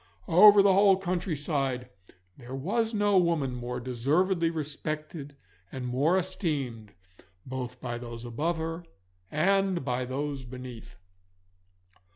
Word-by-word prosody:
Over 200 +3 +8
the 195 -1 +5
whole 195 0 +5
countryside 145 -8 -2 0.5
there 125 +1 -8
was 215 - -1
no 205 -3 +3
woman 165 -7 +1
more 125 0 -4
deservedly 155 +9 +1
respected 155 -1 -5 0.4
and 130 -1 -5
more 140 +9 +2
esteemed 150 - -3 0.5
both 130 -1 -5
by 120 -1 -4
those 120 -1 -8
above 150 +9 -1
her 165 +1 -4 0.5
and 190 0 +1
by 125 +1 -1
those 140 +1 -3
beneath. 125 -5 -9
150 Hz, 115 wpm, -28 LUFS, 125-180 Hz, 0.5 s, Over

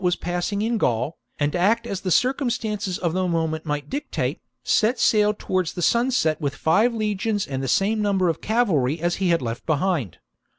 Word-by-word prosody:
was 180 0 +2
passing 180 +4 -2
in 230 0 0
Gaul, 125 - 0 0.2
and 145 +2 0
act 210 +6 +2
as 195 - -4
the 185 - -2
circumstances 230 - 0
of 170 -3 -1
the 185 0 0
moment 160 -2 -1
might 145 -1 -2
dictate, 290 - -3 0.2
set 230 +4 +2
sail 210 -1 +4
towards 185 -4 -2
sunset 235 - +1
with 140 -1 -2
five 215 +10 +3
legions 210 -1 -1
and 135 -1 -4
the 135 - -3
same 210 - +1
number 195 -3 +1
of 165 -2 -1
cavalry 170 - +1
as 175 +1 0
he 190 -2 0
had 170 -5 +2
left 115 0 -4
behind. 155 - 0
185 Hz, 180 wpm, -23 LUFS, 160-215 Hz, 0.2 s, sail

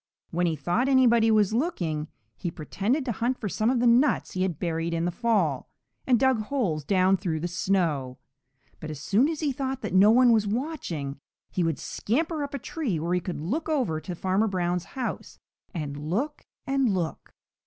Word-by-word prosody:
When 175 +1 +1
he 165 - 0
thought 175 - 0
anybody 235 -4 +5
was 215 -2 +3
looking, 175 - -1 0.3
he 175 - -4
pretended 205 - -2
to 245 - -1
hunt 240 +4 -1
for 215 - -4
some 215 +4 0
of 255 -1 +2
the 245 - +2
nuts 245 +5 +3
he 185 - -3
had 185 -5 0
buried 165 0 -2
in 165 +1 0
the 175 - 0
fall, 180 - 0 0.4
and 245 -3 +4
dug 265 -2 +3
holes 215 - -1
down 185 +4 +3
through 165 -5 -2
the 170 - -2
snow. 170 -8 0 0.6
But 155 - -7
as 150 -3 -6
soon 220 - +2
as 320 -1 -3
he 295 -3 +1
thought 265 -1 -3
that 210 - -3
no 195 +3 +7
one 245 +2 +6
was 215 -2 +3
watching, 200 - -3 0.3
he 180 - 0
would 165 -4 0
scamper 310 - -1
up 285 0 -5
a - - -1
tree 250 - -3
where 170 +3 -1
he 180 - +2
could 180 -2 -5
look 255 - -2
over 240 - 0
to 175 +3 -6
Farmer 190 +5 +1
Brown's 180 -2 -1
house 255 - -4 0.3
and 150 -5 -4
look 195 - -3 0.2
and 270 -2 +2
look. 175 -4 -3
195 Hz, 195 wpm, -26 LUFS, 170-255 Hz, 0.6 s, no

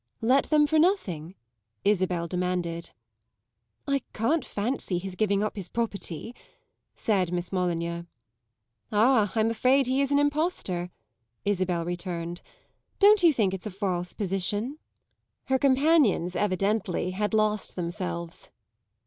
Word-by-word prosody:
"Let 260 +4 +4
them 300 -1 +4
for 315 +1 +2
nothing?" 190 - 0 0.5
Isabel 185 -4 +1
demanded. 180 -1 -2 1.0
"I 280 -1 +1
can't 290 +9 +1
fancy 205 -3 -2
his 190 +1 -5
giving 200 0 +1
up 215 - -2
his 195 -4 -6
property," 225 -3 -4 0.6
said 190 -5 0
Miss 175 0 -3
Molyneux. 170 -2 -1 0.9
"Ah, 220 -1 +4
I'm 225 0 +2
afraid 255 +4 +3
he 260 +2 +1
is 275 - +1
an 285 - +4
impostor!" 290 - 0 0.6
Isabel 185 -4 0
returned. 175 -1 -4 0.6
"Don't 410 0 +6
you 340 -2 +7
think 210 -9 +1
it's 190 +2 -5
a - - -3
false 180 -3 -2
position?" 205 +7 -2 0.7
Her 265 0 +1
companions, 270 - +3
evidently, 195 -2 0
had 210 +3 -1
lost 215 -1 +1
themselves. 90 - -4
200 Hz, 125 wpm, -27 LUFS, 180-255 Hz, 1.0 s, you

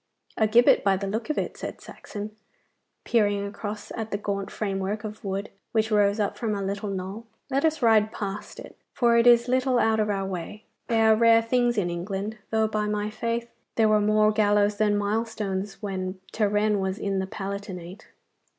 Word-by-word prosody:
'A 220 - +3
gibbet, 235 +3 +5
by 195 -1 +3
the 195 - -4
look 220 +6 -3
of 305 - -1
it,' - - -2
said - - -7
Saxon, 210 +1 -8 0.7
peering 205 -3 +1
across 205 +1 -6
at 225 -1 -4
the 205 - -1
gaunt 200 -1 -3
framework 200 +1 -3
of 215 0 -7
wood, 195 +1 -3 0.2
which 220 0 +1
rose 205 0 +3
up 205 - 0
from 220 -3 -1
a 200 - -3
little 200 +2 -3
knoll. 195 +4 -5 0.2
'Let 275 +3 +2
us 315 -4 0
ride 220 -2 +4
past 205 -1 -6
it, - - -11 0.2
for 235 -2 +3
it 235 +1 +5
is 240 0 +6
little 255 0 +2
out 220 -2 +3
of 210 0 +1
our 195 -1 -1
way. 190 +3 -6 0.2
They 225 -1 +2
are 220 0 +6
rare 230 0 +5
things 240 0 +1
in 175 -4 0
England, 195 +5 -4
though 220 0 +2
by 215 -1 -1
my 210 0 -2
faith 230 +2 -3 0.2
there 220 -1 +4
were 215 0 +4
more 215 +1 +4
gallows 205 -1 +2
than 210 -1 +2
milestones 205 -1 -2
when 185 -1 -4
Turenne 210 -1 +1
was 190 0 -2
in 195 -3 -1
the 190 - -2
Palatinate. 195 -1 -7
210 Hz, 190 wpm, -26 LUFS, 200-225 Hz, 0.7 s, is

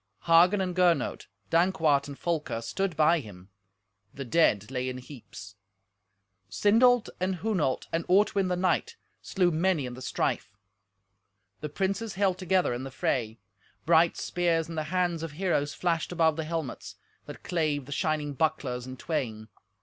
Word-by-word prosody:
Hagen 175 +4 +5
and 180 -2 -2
Gernot, 180 -2 +1 0.2
Dankwart 165 -5 +2
and 140 -1 -8
Folker, 160 -9 -2
stood 180 +8 -3
by 160 +2 +4
him. 100 -7 -12 0.7
The 135 - -6
dead 120 - +2
lay 130 -1 -2
in 130 - -5
heaps. 115 -6 -11 0.9
Sindolt 230 - +4
and 185 +1 0
Hunolt 180 -9 -1
and 165 +1 0
Ortwin 195 +1 +3
the 180 - 0
knight 185 - 0 0.3
slew 180 -2 +1
many 165 -2 +1
in 125 - -6
the 130 - -10
strife. 105 -4 -2 1.0
The 150 - -5
princes 195 +7 -2
held 190 -2 +1
together 185 -6 +1
in 120 - -4
the 135 - -6
fray. 115 -3 -2 0.5
Bright 165 +1 +4
spears 170 -2 0
in 165 - -7
the 155 -1 -3
hands 175 0 0
of 165 -3 -6
heroes 150 -4 -1
flashed 170 -2 -1
above 160 -3 +2
the 160 0 -3
helmets, 160 -5 -5 0.3
that - - -10
clave 155 -5 -1
the 145 - -11
shining 150 0 -1
bucklers 130 -4 -1
in 130 0 -8
twain. 115 -9 -4
165 Hz, 155 wpm, -28 LUFS, 135-180 Hz, 1.0 s, Hagen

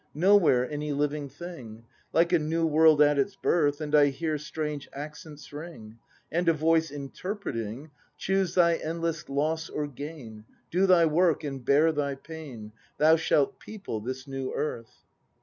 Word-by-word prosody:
Nowhere 165 -8 +4
any 150 +1 -3
living 145 0 -1
thing; 125 -10 -10 0.3
Like 170 +2 +2
a 175 - +5
new 165 +2 0
world 155 -1 +5
at 145 -1 +3
its 195 +8 0
birth; 150 -6 +1
And 150 -1 -5
I 145 -1 +6
hear 155 +2 -2
strange 150 -1 -5
accents 150 0 -9
ring, 145 -8 -9 0.3
And 170 +2 +1
a - - +5
Voice 160 +1 +2
interpreting: 140 - -6 0.3
"Choose 190 -2 0
thy 170 -2 +4
endless 165 -1 -3
loss 155 +4 -1
or 150 - -3
gain. 140 -6 -9 0.3
Do 185 +3 +3
thy 180 -3 +6
work 165 +1 +2
and 135 -3 -5
bear 150 +5 +4
thy 145 -2 -2
pain; 135 -8 -10
— - - -36
Thou 155 +2 +6
shalt 150 -3 +1
people 200 - -6
this 130 +3 -5
new 135 -1 -4
earth!" 115 -6 -5
150 Hz, 160 wpm, -27 LUFS, 140-165 Hz, 0.3 s, I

